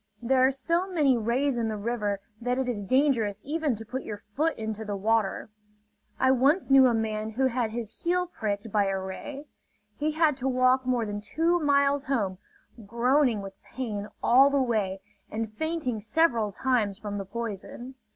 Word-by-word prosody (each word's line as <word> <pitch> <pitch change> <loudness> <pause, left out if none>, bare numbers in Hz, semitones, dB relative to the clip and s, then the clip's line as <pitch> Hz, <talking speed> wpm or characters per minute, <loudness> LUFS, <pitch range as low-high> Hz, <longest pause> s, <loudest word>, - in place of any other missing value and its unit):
There 255 +2 +2
are 260 - +5
so 335 +8 -1
many 295 -7 +3
rays 240 +3 0
in 230 - 0
the 215 -1 -3
river 210 -2 -2 0.2
that 245 +1 -1
it 265 -1 -1
is 220 -5 -2
dangerous 235 -4 +2
even 300 -3 -1
to 225 +1 -9
put 255 +5 -4
your 210 -4 -6 0.2
foot 320 +3 +1
into 220 0 -4
the 205 -1 -4
water. 215 0 0 0.7
I 260 0 +4
once 275 +6 +2
knew 270 -1 +8
a 240 - +2
man 215 -1 -2
who 265 +4 +1
had 245 -3 0
his 225 -1 -6
heel 360 +1 +1
pricked 215 - -4
by 205 -1 +2
a 195 0 -1
ray. 270 +10 -7 0.5
He 305 +1 0
had 310 -3 +2
to 265 -1 -2
walk 255 0 +3
more 245 -3 +1
than 205 0 -4
two 330 +11 +1
miles 280 -1 +2
home, 205 -10 -1 0.4
groaning 235 +1 +2
with 195 0 -10
pain 210 -6 -5 0.2
all 270 +3 +6
the 280 - +1
way 210 -7 0 0.3
and 220 0 -4
fainting 315 -4 -2
several 225 -2 +1
times 215 -3 0
from 205 -1 -5
the 195 - -5
poison. 235 +4 -6
240 Hz, 180 wpm, -27 LUFS, 215-275 Hz, 0.7 s, knew